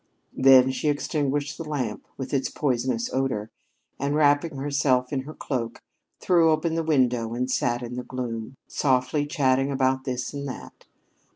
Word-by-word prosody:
Then 130 Hz, -1 st, +6 dB
she 150 Hz, +3 st, -1 dB
extinguished 145 Hz, 0 st, -1 dB
the -, -, -3 dB
lamp, 140 Hz, -8 st, -4 dB
with 135 Hz, 0 st, -6 dB
its 135 Hz, -1 st, +1 dB
poisonous 125 Hz, -4 st, -1 dB
odor, 130 Hz, -5 st, -1 dB, 0.5 s
and, 140 Hz, +2 st, 0 dB
wrapping 145 Hz, +1 st, +3 dB
herself 135 Hz, -2 st, +1 dB
in 135 Hz, -, +1 dB
her 155 Hz, -, -8 dB
cloak 120 Hz, -5 st, -4 dB, 0.4 s
threw 170 Hz, -3 st, +4 dB
open 160 Hz, +1 st, +1 dB
the 165 Hz, -, 0 dB
window 125 Hz, -7 st, +1 dB
and 125 Hz, +1 st, -1 dB
sat 120 Hz, 0 st, 0 dB
in 120 Hz, 0 st, -6 dB
the 125 Hz, -, -3 dB
gloom, 125 Hz, -1 st, -5 dB
softly 130 Hz, +2 st, +1 dB
chatting 135 Hz, -2 st, +1 dB
about 130 Hz, -1 st, +1 dB
this 125 Hz, -1 st, -3 dB
and 140 Hz, 0 st, -4 dB
that. 130 Hz, -, -9 dB
135 Hz, 160 wpm, -25 LUFS, 125-145 Hz, 0.5 s, Then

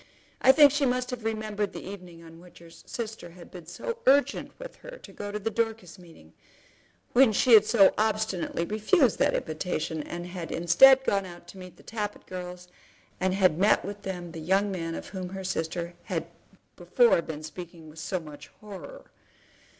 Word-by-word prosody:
I 265 Hz, -, +8 dB
think 290 Hz, 0 st, +7 dB
she 285 Hz, -1 st, +1 dB
must 250 Hz, 0 st, -1 dB
have 245 Hz, -2 st, -6 dB
remembered 215 Hz, -2 st, -3 dB
the -, -, -8 dB
evening 180 Hz, -4 st, -10 dB
on 165 Hz, 0 st, -14 dB
which 180 Hz, 0 st, -17 dB
her 170 Hz, -1 st, -15 dB
sister 220 Hz, -1 st, -7 dB
had 175 Hz, -, -13 dB
been 175 Hz, -3 st, -11 dB
so 470 Hz, -, -5 dB
urgent 280 Hz, +2 st, +3 dB
with -, -, -10 dB
her -, -, -11 dB
to -, -, -14 dB
go 205 Hz, 0 st, -6 dB
to 210 Hz, -, -3 dB
the 220 Hz, +2 st, -3 dB
Dorcas 220 Hz, -6 st, -3 dB
meeting; 160 Hz, -, -17 dB, 0.8 s
when 255 Hz, -2 st, +6 dB
she 235 Hz, +3 st, +3 dB
had 215 Hz, -1 st, +8 dB
so 205 Hz, -4 st, +5 dB
obstinately 215 Hz, -6 st, -1 dB
refused 220 Hz, -, +2 dB
that -, -, +2 dB
invitation, 160 Hz, 0 st, -3 dB
and 175 Hz, +3 st, -7 dB
had 175 Hz, -2 st, -7 dB
instead 260 Hz, +11 st, +6 dB
gone 195 Hz, -6 st, 0 dB
out 175 Hz, -1 st, -13 dB
to 190 Hz, -, -12 dB
meet 180 Hz, -2 st, -12 dB
the -, -, -18 dB
Tappitt 210 Hz, -2 st, -5 dB
girls, 180 Hz, -1 st, -8 dB, 0.5 s
and 185 Hz, 0 st, 0 dB
had 185 Hz, -4 st, +3 dB
met 205 Hz, +3 st, +3 dB
with 205 Hz, +1 st, -7 dB
them 175 Hz, -3 st, -6 dB
the 165 Hz, -, -8 dB
young 195 Hz, +5 st, +1 dB
man 165 Hz, -3 st, -4 dB
of -, -, -8 dB
whom 185 Hz, -2 st, -6 dB
her 190 Hz, 0 st, -7 dB
sister 170 Hz, -1 st, -3 dB
had -, -, -3 dB, 0.5 s
before 480 Hz, -, +3 dB
been 155 Hz, -2 st, -7 dB
speaking 165 Hz, 0 st, -10 dB
with 155 Hz, +1 st, -12 dB
so 185 Hz, +3 st, -3 dB
much 150 Hz, -3 st, -12 dB
horror. 195 Hz, -8 st, -11 dB
190 Hz, 190 wpm, -27 LUFS, 170-220 Hz, 0.8 s, I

